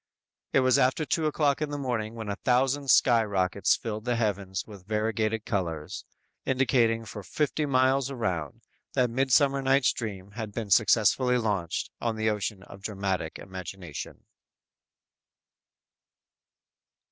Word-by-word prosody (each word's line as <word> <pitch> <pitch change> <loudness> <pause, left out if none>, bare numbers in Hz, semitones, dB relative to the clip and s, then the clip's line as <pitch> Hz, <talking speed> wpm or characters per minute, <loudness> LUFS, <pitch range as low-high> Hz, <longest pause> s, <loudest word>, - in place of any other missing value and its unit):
It 135 - +4
was 130 -1 +4
after 130 +5 +2
two 155 +1 0
o'clock 150 -1 +1
in 150 - -1
the 145 - -4
morning 115 -5 -3
when 110 -2 -6
a 100 - -2
thousand 135 +2 +1
sky 120 -2 +5
rockets 95 -2 +1
filled 110 -2 -5
the 120 0 0
heavens 100 -5 -2
with 100 -3 -13
variegated 110 0 -1
colors, 85 -7 -3 0.4
indicating 120 -3 +2
for 105 - -7
fifty 150 +7 -1
miles 130 0 +2
around, 90 - -3 0.3
that 125 -2 +2
"Midsummer 135 +2 +3
Night's 135 0 +3
Dream" 100 -4 -6
had 110 -1 -6
been 110 -3 -5
successfully 120 +4 +4
launched 100 -8 -2
on 115 -2 -1
the 110 0 +1
ocean 105 -2 -3
of 100 0 -13
dramatic 95 -5 -3
imagination! 95 -3 -8
110 Hz, 135 wpm, -27 LUFS, 100-130 Hz, 0.4 s, sky